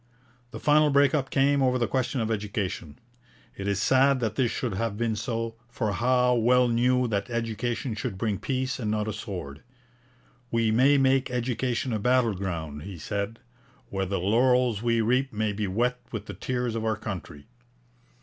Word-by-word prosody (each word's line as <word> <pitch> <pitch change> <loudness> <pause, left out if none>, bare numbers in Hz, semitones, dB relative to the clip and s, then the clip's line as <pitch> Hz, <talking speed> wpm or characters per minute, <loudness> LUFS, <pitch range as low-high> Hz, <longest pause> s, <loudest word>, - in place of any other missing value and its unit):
The - - -8
final 150 0 +4
break 140 +1 +4
up 135 -3 0
came 140 +1 +3
over 130 -1 +3
the 120 - +1
question 130 -1 -1
of 110 0 -1
education. 100 -7 -3 0.6
It 100 - -5
is 100 -1 0
sad 135 +4 +4
that 110 -3 -1
this 120 +1 +1
should 120 -2 -3
have 105 +1 -2
been 115 -1 0
so, 115 0 -3
for 115 -3 -2
Howe 125 +4 +2
well 125 +1 +4
knew 125 +2 +2
that 100 +2 -2
education 115 +1 -2
should 110 -2 -4
bring 105 -1 -1
peace 130 -1 -2
and 110 -4 -2
not 105 0 -1
a 110 - -2
sword. 80 -9 -7 0.9
We 115 -1 +1
may 135 +6 +5
make 135 0 +3
education 125 0 -1
a 110 - 0
battle 125 0 +2
ground,' 80 -6 -4
he 95 +2 -8
said, 100 +6 -3 0.5
'where 95 -1 -1
the 95 +1 -1
laurels 120 +3 +2
we 115 -1 +2
reap 130 +4 +1
may 110 -1 -1
be 105 0 -2
wet 120 +6 0
with 110 -3 -5
the - - -7
tears 125 -2 -2
of 115 -1 -3
our 110 -1 0
country.' 90 -9 -7
115 Hz, 180 wpm, -27 LUFS, 105-125 Hz, 0.9 s, may